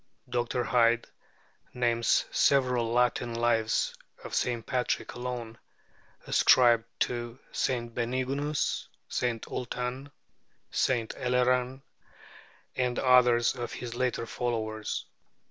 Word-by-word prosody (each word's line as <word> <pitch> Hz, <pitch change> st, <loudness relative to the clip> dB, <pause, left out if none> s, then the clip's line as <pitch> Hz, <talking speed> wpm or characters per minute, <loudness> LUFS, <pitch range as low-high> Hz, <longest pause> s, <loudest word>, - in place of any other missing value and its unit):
Dr. 120 Hz, 0 st, -1 dB
Hyde 120 Hz, -1 st, +3 dB, 0.7 s
names 120 Hz, -1 st, +2 dB
several 125 Hz, -4 st, +2 dB
Latin 120 Hz, -1 st, +1 dB
lives 115 Hz, -1 st, +1 dB, 0.3 s
of -, -, -8 dB
St. 120 Hz, -2 st, -1 dB
Patrick 125 Hz, -1 st, -1 dB
alone, 120 Hz, -2 st, -5 dB, 0.7 s
ascribed 120 Hz, -3 st, +5 dB, 0.2 s
to 120 Hz, 0 st, -2 dB
St. 120 Hz, -3 st, -1 dB
Benignus, 130 Hz, +5 st, -1 dB, 0.2 s
St. 120 Hz, -3 st, -2 dB
Ultan, 125 Hz, +2 st, -4 dB, 0.6 s
St. 120 Hz, -4 st, 0 dB
Eleran, 125 Hz, +1 st, +1 dB, 0.9 s
and 125 Hz, -1 st, 0 dB
others 125 Hz, -2 st, +4 dB
of 120 Hz, -2 st, -5 dB
his 120 Hz, -1 st, -6 dB
later 125 Hz, -1 st, -1 dB
followers. 110 Hz, -3 st, -3 dB
120 Hz, 95 wpm, -29 LUFS, 115-125 Hz, 0.9 s, ascribed